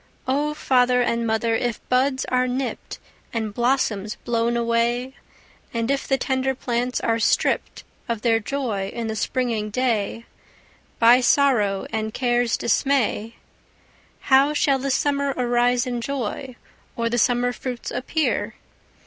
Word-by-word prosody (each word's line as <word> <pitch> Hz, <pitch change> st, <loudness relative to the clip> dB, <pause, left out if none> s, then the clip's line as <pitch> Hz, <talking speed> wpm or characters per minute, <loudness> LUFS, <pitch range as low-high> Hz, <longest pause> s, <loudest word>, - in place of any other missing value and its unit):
O 295 Hz, +3 st, 0 dB
father 250 Hz, -3 st, +3 dB
and 235 Hz, -1 st, 0 dB
mother 220 Hz, +1 st, +1 dB
if 235 Hz, 0 st, -1 dB
buds 260 Hz, +1 st, +1 dB
are 255 Hz, 0 st, +1 dB
nipped, 255 Hz, +1 st, -4 dB, 0.3 s
And 220 Hz, -3 st, -3 dB
blossoms 235 Hz, -3 st, 0 dB
blown 235 Hz, 0 st, +1 dB
away; 235 Hz, +2 st, 0 dB, 0.6 s
And 230 Hz, +3 st, 0 dB
if 275 Hz, -, -1 dB
the 270 Hz, -, +2 dB
tender 265 Hz, 0 st, -1 dB
plants 245 Hz, 0 st, -1 dB
are 230 Hz, 0 st, +1 dB
stripped 220 Hz, -, 0 dB, 0.3 s
Of 230 Hz, -2 st, -2 dB
their 225 Hz, -2 st, +3 dB
joy 220 Hz, -5 st, -3 dB
in 235 Hz, -1 st, -4 dB
the 220 Hz, 0 st, -3 dB
springing 225 Hz, -1 st, -1 dB
day, 230 Hz, -1 st, -1 dB, 0.7 s
By 235 Hz, +2 st, +6 dB
sorrow 240 Hz, -8 st, +2 dB
and 220 Hz, 0 st, -3 dB
care's 240 Hz, -2 st, +1 dB
dismay,— 235 Hz, -3 st, 0 dB, 0.9 s
How 275 Hz, +2 st, +4 dB
shall 275 Hz, -2 st, +2 dB
the 275 Hz, +1 st, -2 dB
summer 280 Hz, 0 st, 0 dB
arise 245 Hz, 0 st, +2 dB
in 245 Hz, -2 st, -3 dB
joy, 260 Hz, 0 st, -4 dB, 0.4 s
Or 230 Hz, 0 st, -1 dB
the 240 Hz, +1 st, 0 dB
summer 245 Hz, +1 st, +2 dB
fruits 250 Hz, -1 st, -5 dB
appear? 290 Hz, +5 st, -1 dB
245 Hz, 135 wpm, -23 LUFS, 230-260 Hz, 0.9 s, By